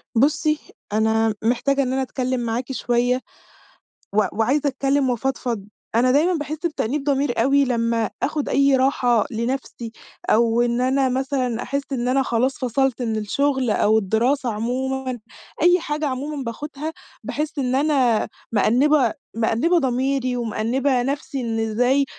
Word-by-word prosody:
بُصّي، 305 +4 +2 0.3
أنا 220 0 +2
محتاجة 275 +4 +1
إن 255 0 -2
أنا 265 - 0
أتكلّم 255 -1 -2
معاكِ 240 +2 -3
شوية، 245 0 0 0.9
و 215 - +5
وعايزه 270 +6 +1
أتكلّم، 275 0 +1
وأفضفض، 240 -4 -2 0.3
أنا 250 +2 +4
دايمًا 315 +7 +3
باحس 305 -1 -3
بتأنيب 295 -3 -1
ضمير 275 -4 +1
أوي 280 +2 +3
لمّا 230 -2 0
آخد 300 0 -1
أي 275 0 +4
راحة 250 -4 +2
لنفسي، 235 0 -4 0.4
أو 230 +1 +3
إن 240 0 +1
أنا 265 +1 +2
مثلًا 255 -2 -1
أحس 280 +1 -2
إن 245 -2 -1
أنا 265 +2 +2
خلاص 255 +2 0
فصلت 260 0 0
من 225 -2 -1
الشغل، 265 +4 0
أو 215 +1 +3
الدراسة 235 +6 +1
عمومًا، 255 +3 -2 0.4
أي 355 +2 +5
حاجة 305 -2 -3
عمومًا 280 +2 -4
باخدها، 290 +6 -5 0.3
باحس 300 0 -3
إن 255 -1 0
أنا 265 -6 +2 0.2
مأنبة 250 +4 +3 0.2
مأنبة 235 +10 +2
ضميري، 260 -1 0
ومأنبة 245 +3 0
نفسي، 275 +1 -3
"إن 225 -2 -2
إزاي 245 +5 +2
255 Hz, 140 wpm, -22 LUFS, 235-275 Hz, 0.9 s, و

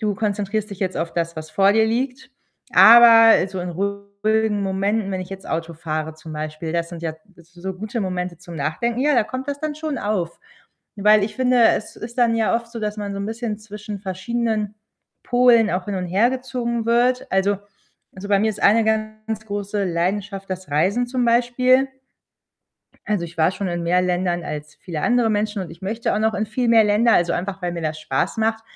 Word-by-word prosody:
du 210 -2 0
konzentrierst 210 0 -2
dich 200 - -8
jetzt 190 -2 -2
auf 165 0 -3
das, 170 -1 -2
was 155 0 -8
vor 195 +5 +4
dir 220 +1 +3
liegt.“ 250 +3 -2 0.4
Aber 230 -1 +9 0.2
so 190 - -6
in 180 0 -4
ruhigen 200 +3 -1
Momenten, 195 +2 -1
wenn 185 -1 -3
ich 185 - -12
jetzt 195 0 -8
Auto 165 +1 -3
fahre 155 -1 -4
zum 160 0 -11
Beispiel, 155 +1 -5
das 170 0 -2
sind 170 -2 -8
ja 160 -2 -3 0.2
s 170 0 -20
so 185 +2 -5
gute 215 +5 -5
Momente 180 -2 -3
zum 175 +1 -12
Nachdenken. 165 - -2
Ja, 295 +2 +3
da 240 - +3
kommt 260 +4 -6
das 285 0 -3
dann 310 -1 -3
schon 305 -1 -4
auf. 195 -7 -2 0.6
Weil 210 +1 +5
ich 210 - -7
finde, 255 -2 +3
es - - -6
ist 235 +3 -9
dann 235 -2 +3
ja 225 0 +1
oft 230 0 -3
so, 235 - -7
dass 210 0 -3
man 205 -1 -4
so - - -5
'n 200 - -3
bisschen 225 -1 -4
zwischen 210 -1 -8
verschiedenen 215 +2 -2 0.5
Polen 245 -3 +4
auch 180 +2 -2
hin 205 - -3
und 180 -1 -3
hergezogen 235 +3 -1
wird. 245 +2 +2
Also 195 +1 +2 0.6
also, 190 +2 -8
bei 200 -1 +3
mir 220 +1 +2
ist 210 - -8
eine 220 +3 +5
ganz 215 0 -2
große 205 0 -3
Leidenschaft 195 +3 -2
das 185 -3 -5
Reisen 195 +12 +1
zum 250 0 -1
Beispiel. 250 +3 +3 1.2
Also, 205 -5 0
ich 170 0 -11
war 160 +2 +4
schon 190 0 -4
in 175 0 -3
mehr 180 +2 +2
Ländern 175 -1 -1
als 150 0 -6
viele 170 -5 -6
andere 240 -2 +2
Menschen, 210 -1 -1
und 180 - -8
ich 165 +2 -14
möchte 225 +4 -2
auch - - 0
noch 220 0 +1
in 215 +1 -1
viel 235 +3 -1
mehr 225 -1 +6
Länder, 210 +3 +3
also, 175 0 +2
einfach 190 +1 -4
weil 175 -1 -2
mir 170 - -5
das 155 0 -3
Spaß 155 +2 -2
macht. 225 0 0
205 Hz, 210 wpm, -21 LUFS, 180-225 Hz, 1.2 s, Aber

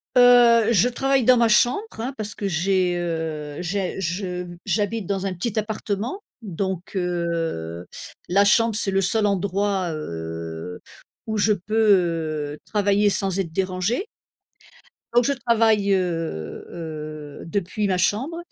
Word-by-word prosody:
Heu, 240 -2 +6
je 230 +3 +4
travaille 270 0 +1
dans 255 -1 +6
ma 235 -1 +4
chambre 240 - +4 0.2
hein, 255 +4 -3
parce 210 -1 -4
que 200 - -3
j'ai 180 +1 +1
heu, 160 -4 -3
j'ai 190 +1 -2
je 180 0 -3
mmh, 175 -1 -10
j'habite 205 +1 -1
dans 195 -1 -2
un 190 - -1
petit 215 +5 -3
appartement, 215 - -3 0.2
donc 190 0 -4
heu, 165 - -2 0.4
la 200 +3 +4
chambre 230 +1 +4
c'est 200 -2 0
le 195 0 +2
seul 210 +3 +1
endroit 195 -2 0
heu, 80 - -6 0.5
où 220 -1 -2
je 210 +1 +3
peux 205 +3 -7 0.8
heu, - - -9
travailler 205 0 +2
sans 195 -1 0
être 170 -4 -2
dérangée. 190 - -1 1.1
Donc 240 0 +4
je 280 - +2
travaille 225 -5 +2
heu 165 - -2
heu, 155 -3 -7
depuis 200 +3 -2
ma 185 -1 +1
chambre 260 - 0
195 Hz, 145 wpm, -23 LUFS, 170-220 Hz, 1.1 s, Heu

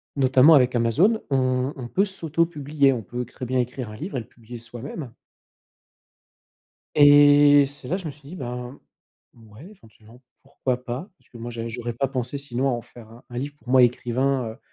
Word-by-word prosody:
notamment 135 +3 +5
avec 125 -2 +3
Amazon 155 - +2
on 130 0 0
on 125 -3 -7
peut 195 - +1
s'auto-publier, 155 -6 0
on 115 -4 -5
peut 125 +5 -5
très 125 +2 -9
bien 130 +1 -1
écrire 125 -1 -3
un 105 - -9
livre 160 - -5
et - - -2
le 110 - -14
publier 120 0 -12
soi-même 120 +3 -8 1.8
et 145 -1 +7
c'est 140 -2 -10
là 180 - 0
je 185 -4 -8
me - - -3
suis 145 0 -17
dit, 180 - -9
ben, 125 -1 -6 0.6
ouais, 110 +5 -15
éventuellement 115 - -19 0.2
pourquoi 125 -1 -3
pas, 130 - -6
parce - - -31
que 120 - -13
moi 120 +1 -6
j'ai 115 0 -5
j'aurais 120 0 -5
pas 135 +4 -1
pensé 130 +1 -4
sinon 135 -1 -2
à - - +2
en 120 -1 -3
faire 115 -2 -15
un 115 +2 -16
un 120 - -5
livre, 145 +3 -5
pour 125 - -20
moi 130 0 +5
écrivain, 125 +1 0
heu, 120 - -16
130 Hz, 195 wpm, -23 LUFS, 120-145 Hz, 1.8 s, et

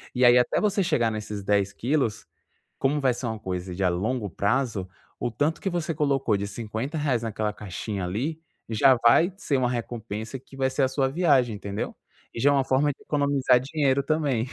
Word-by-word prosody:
E 125 0 +4
aí 120 0 +7
até 125 - +1
você 200 -2 +2
chegar 120 -9 +1
nesses 105 -2 -5
10 100 0 +1
quilos, 120 -5 -1 0.5
como 140 +2 +1
vai 130 -2 +3
ser 125 - -5
uma 110 -1 -4
coisa 90 -1 -4
de 95 +2 -3
a 90 - +4
longo 105 +5 -1
prazo 105 +1 -1 0.3
o 120 - -2
tanto 145 +8 0
que 195 - -1
você 170 -2 -2
colocou 135 -7 +1
de 100 - -3
R$50 120 - -2
naquela 110 -1 -2
caixinha 100 0 -5
ali, 130 - -3 0.3
já 130 +4 +5
vai 165 +10 +5
ser 145 -8 0
uma 125 -1 +1
recompensa 115 -1 -5
que 135 - -16
vai 130 0 +1
ser 135 +1 0
a - - +4
sua 135 +1 0
viagem 135 -7 +2
entendeu? 100 0 -5 0.4
E - - -6
já 145 - +5
é - - +3
uma 135 -1 +3
forma 135 +3 +2
de 140 - -15
economizar 140 -4 +2
dinheiro 140 0 +1
também. 140 -7 0
125 Hz, 200 wpm, -26 LUFS, 105-140 Hz, 0.5 s, aí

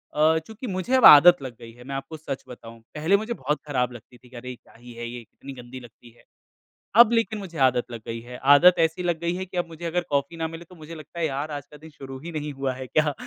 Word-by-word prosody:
अ, 155 +2 +3
चूँकि 220 +3 -8
मुझे 190 +5 -3
अब 260 - +5
आदत 170 +3 +9
लग 130 -3 -7
गई 115 -1 -11
है 120 +1 -15
मैं 135 +2 -6
आपको 145 +4 -7
सच 140 -3 -6
बताऊँ। 115 -2 -12 0.2
पहले 160 +6 +2
मुझे 220 +3 -4
बहुत 150 - -2
ख़राब 125 -4 -1
लगती 120 +1 -14
थी 125 +1 -21
कि 125 - -16
अरे! 125 +1 -8
क्या - - -24
ही 120 +1 -13
है 120 0 -7
ये 120 0 -8
कितनी 135 +4 -12
गंदी 125 0 -10
लगती 120 0 -16
है। 120 - -24 0.8
अब 235 -1 +5
लेकिन 225 -2 0
मुझे 180 -5 -9
आदत 125 -2 +3
लग 115 -2 -7
गई 115 0 -4
है। 125 +1 -10 0.2
आदत 180 +5 +7
ऐसी 165 +2 +1
लग 175 -2 -1
गई 170 0 -1
है 185 +1 -4
कि 185 0 -9
अब 175 - -1
मुझे 165 +1 -9
अगर 175 +1 -1
कॉफ़ी 140 +3 -1
ना 160 0 -2
मिले 165 +1 -10
तो 180 - -17
मुझे 160 0 -11
लगता 155 +2 -11
है 165 - +1
यार 140 +2 -4
आज 145 -1 -6
का 150 - -12
दिन 160 +2 -14
शुरू 135 -2 -10
ही 170 +5 -8
नहीं 150 -2 -5
हुआ 135 -1 -3
है 130 0 -8
क्या 150 +2 +1
150 Hz, 275 wpm, -24 LUFS, 125-170 Hz, 0.8 s, आदत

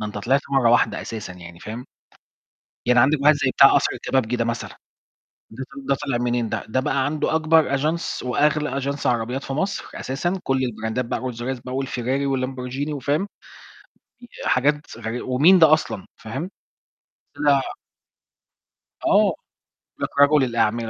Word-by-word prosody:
ده 105 - -3
أنت 105 0 -6
طلعت 135 +6 +2
مرّة 135 -4 +3
واحدة 120 - +2
أساسًا 105 -4 -6
يعني، 85 -1 -12
فاهم؟ 115 +5 -7 1.0
يعني 125 0 +4
عندك 140 +3 +3
واحد 150 +2 +6
زي 145 -2 0
بتاع - - +7
قصر - - +3
الكبابجي 125 -3 -1
ده 115 -1 -1
مثلًا، 115 0 -3 0.8
ده 125 +4 -7
ط - - -13 0.2
ده 140 - +4
طلِع 135 -4 -2
منين 120 -2 -1
ده؟ - - -3
ده 130 +4 0
بقى 130 +1 0
عنده 150 +1 -1
أكبر 160 -3 +3
Agence 155 +2 -2
وأغلى 145 +1 +1
Agence 140 +1 -3
عربيات 125 +3 0
في 135 - -5
مصر 190 +7 -2
أساسًا، 175 +8 -2
كُل 135 -1 0
البراندات 110 0 -2
بقى - - -3
Rolls 125 -2 -5
Royce 125 +1 -4
بقى 125 - -5
والFerrari 135 +2 -2
والLamborghini 130 +3 -4
وفاهم؟ 145 +7 -1 1.0
ي 240 - -11 0.2
حاجات 145 +1 +1
غري 115 +2 -4
ومين 150 +9 +5
ده 160 -2 +6
أصلًا؟ 130 -10 0
فاهم؟ 135 - -6 0.9
طلع 145 -1 +3 1.5
آه، - - +5
قال - - -7 0.6
لك - - -2
رجُل 145 0 +6
الأعمال، 115 -1 0
130 Hz, 160 wpm, -22 LUFS, 120-145 Hz, 1.5 s, بتاع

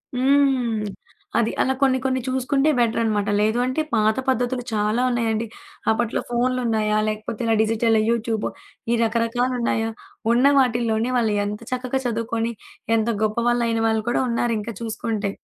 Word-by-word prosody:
హ్మ్. 260 -4 +2 0.6
అది. 230 -1 +2
అలా 265 - +2
కొన్ని 265 -1 +4
కొన్ని 260 -1 0
చూసుకుంటే 265 +3 +1
బెటరనమాట. 220 -3 +1
లేదు 215 +2 +2
అంటే 255 +5 0
పాత 215 0 +2
పద్ధతులు 245 0 0
చాలా 215 +2 +1
ఉన్నాయండి. 230 -2 0 0.4
అప్పట్లో 225 0 0
ఫోన్లున్నాయా? 235 -3 +1
లేకపోతే 215 +1 -4
ఇలా 225 -1 +2
డిజిటలు, 225 0 +2
యూట్యూబు 230 -2 0 0.4
ఈ - - +2
రకరకాలున్నాయా? 230 0 0 0.4
ఉన్న 245 +3 +3
వాటిల్లోనే 235 -2 +1
వాళ్ళు 225 -3 +1
ఎంత 210 +1 -4
చక్కగా 255 +1 -1
చదువుకొని 230 0 -1 0.5
ఎంత 220 +1 0
గొప్పవాళ్ళయిన 235 +1 +1
వాళ్ళు 220 -1 +1
కూడా 240 - +1
ఉన్నారు 235 0 0
ఇంకా 230 +2 -5
చూసుకుంటే. 220 -2 -2
230 Hz, 130 wpm, -22 LUFS, 220-245 Hz, 0.6 s, కొన్ని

